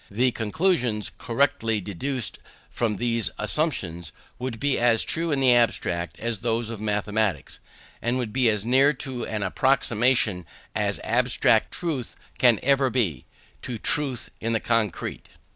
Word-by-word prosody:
The 125 +5 +1
conclusions 120 - 0
correctly 115 -3 +1
deduced 110 +6 -4 0.3
from 115 -3 -1
these 115 +1 +2
assumptions, 90 - -1 0.3
would 125 -3 -4
be 140 +2 +1
as 115 -2 +3
true 165 0 -1
in 140 - +1
the 130 -2 +5
abstract 90 -7 0
as 115 -2 -2
those 115 0 -1
of 110 -2 -7
mathematics; 105 -4 -1 0.4
and 120 +2 0
would 120 -4 -3
be 125 -2 +3
as 105 -1 -1
near 135 +3 +4 0.3
an 105 -2 -3
approximation 120 - +2 0.3
as - - -1
abstract - - +2
truth 150 -9 -3 0.2
can 120 -4 +5
ever 135 0 +3
be, 100 - -1 0.4
to 120 - -5
truth 135 +1 -1
in 115 +1 -1
the 110 - +1
concrete. 115 -4 -2
115 Hz, 140 wpm, -25 LUFS, 105-130 Hz, 0.4 s, the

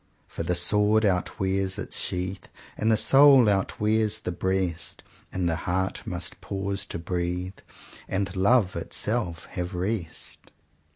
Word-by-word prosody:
"For - - -7
the 90 +2 0
sword 105 +5 +3
outwears 95 0 0
its 105 - -2
sheath, 90 0 -2 0.3
And 110 +1 +1
the 110 - +4
soul 135 -1 +7
outwears 105 +2 +1
the - - -2
breast; 95 -1 -2 0.3
And 90 -2 -1
the 85 - +1
heart 95 +2 -1
must 90 -2 -4
pause 100 0 -3
to - - -4
breathe; 90 +2 -3 0.5
And 95 -1 -2
love 100 0 +3
itself 95 -7 -2
have 90 +1 -4
rest." 90 -2 -4
95 Hz, 130 wpm, -26 LUFS, 90-105 Hz, 0.5 s, soul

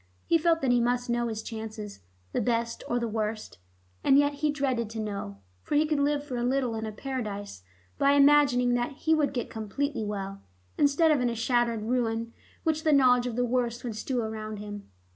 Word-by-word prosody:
He 330 - +3
felt 330 0 +2
that 265 -2 +2
he 245 -1 +4
must 245 +1 0
know 240 0 0
his 220 -1 -4
chances, 220 -2 -7 0.3
the - - 0
best 230 -1 -1
or 240 - 0
the 235 -1 -1
worst... 215 - -3 0.4
and 270 - +5
yet 290 0 +3
he 300 +1 0
dreaded 260 -6 -1
to 225 0 -6
know, 200 - -4 0.2
for - - -3
he 300 +1 +4
could 305 -1 0
live 285 0 +1
for 265 -4 -5
a 240 - -1
little 255 -1 +1
in 220 0 -3
a - - -4
paradise 210 - -5 0.4
by 280 0 +4
imagining 280 -4 +5
that 245 +3 0
he 315 +3 +1
would 305 -2 +2
get 245 -3 -4
completely 225 +5 -3
well, 195 -1 -5 0.3
instead 290 +3 +4
of 290 -4 +3
in 245 - +2
a 235 - -3
shattered 235 -1 +1
ruin 230 -1 -1 0.3
which 315 -1 0
the 310 - +3
knowledge 250 -3 +5
of 240 - -4
the 245 0 +1
worst 240 -1 -1
would 235 -3 -4
strew 245 +2 -2
round 215 -1 -5
him. 205 0 -8
240 Hz, 210 wpm, -28 LUFS, 220-280 Hz, 0.4 s, and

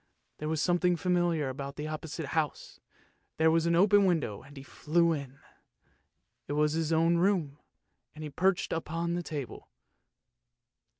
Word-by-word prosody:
There 150 - -3
was 160 -1 -1
something 175 +2 +2
familiar 175 -4 +1
about 140 +1 -6
the 150 - -5
opposite 155 -1 -5
house; 155 -3 -2 0.6
there 160 0 +4
was 165 0 +2
an 170 - +3
open 200 +2 +5
window, 155 - -1
and 140 +2 -15
he 135 - -8
flew 170 +4 +1
in. 140 -3 -6 1.1
it - - -3
was 150 0 +2
his 160 0 -1
own 165 +1 +3
room, 170 -6 +1 0.6
and 155 - -8
he 150 - -6
perched 185 +5 +1
upon 165 +1 -2
the 175 - -1
table. 150 -6 -7
160 Hz, 155 wpm, -30 LUFS, 150-170 Hz, 1.1 s, open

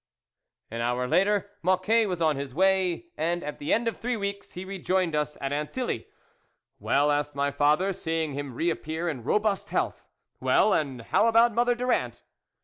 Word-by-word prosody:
An 115 +1 -3
hour 125 +1 0
later 200 +6 +2
Mocquet 185 +5 +3
was 180 -3 -2
on 155 -2 +3
his 135 -1 -6
way, 190 - +2
and, 170 +1 -1
at 150 - -6
the 145 - -3
end 230 +1 +2
of 230 - -2
three 245 0 -2
weeks, 200 -1 -5
he 180 +1 -6
rejoined 185 -3 -1
us 150 0 -1
at 135 0 -3
Antilly. 150 - -3 0.4
" - - -49
Well," 145 +1 +2
asked 145 0 -1
my 140 0 0
father, 150 +7 +2
seeing 160 -4 -2
him 140 -3 -5
reappear 165 +1 -2
in 140 -8 -3
robust 205 - 0
health, - - -2 0.2
" - - -52
well, 215 - +3
and 135 -6 -1
how 215 - +2
about 230 +1 +5
Mother 240 +2 +2
Durand 250 +1 -1
175 Hz, 180 wpm, -27 LUFS, 145-200 Hz, 0.4 s, about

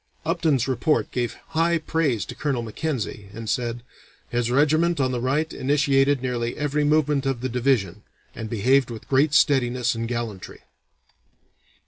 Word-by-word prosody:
Upton's 160 -6 +1
report 135 +4 0
gave 120 -2 -2
high 165 +1 +2
praise 155 - -1
to - - -7
Colonel 135 -5 -2
Mackenzie, 115 -4 -4
and 115 0 -7
said: 120 0 -2 0.5
"His 120 -1 -1
regiment 155 +5 +2
on 130 -1 +1
the 125 -2 -2
right 145 +5 0
initiated 140 -1 +2
nearly 120 -2 -2
every 150 0 0
movement 145 -2 +2
of 130 -3 -1
the 130 - -2
division, 115 -6 0 0.3
and 110 -1 -6
behaved 125 +4 +2
with 115 -2 -8
great 145 +2 +3
steadiness 125 -5 +3
and 115 0 -3
gallantry." 115 -5 -5
130 Hz, 145 wpm, -24 LUFS, 120-150 Hz, 0.5 s, great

